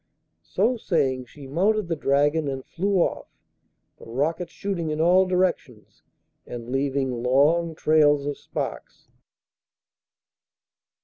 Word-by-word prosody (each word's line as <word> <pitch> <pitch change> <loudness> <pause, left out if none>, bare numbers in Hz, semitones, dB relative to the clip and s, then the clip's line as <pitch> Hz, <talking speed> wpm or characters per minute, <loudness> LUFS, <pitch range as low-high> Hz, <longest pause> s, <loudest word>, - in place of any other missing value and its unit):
So 230 +6 +1
saying 135 - 0
she 140 +3 -13
mounted 195 +8 +1
the 165 - -1
dragon 145 +2 +1
and 135 -1 -4
flew 195 +3 -2
off, 175 - 0 0.7
the - - -14
rockets 155 +9 -2
shooting 180 -5 -3
in 155 0 -3
all 180 +3 +4
directions 180 - -2 0.5
and 120 0 -7
leaving 135 -2 -1
long 155 +7 +2
trails 150 -2 +3
of 145 -1 -4
sparks. - - -6
150 Hz, 115 wpm, -24 LUFS, 135-175 Hz, 0.7 s, all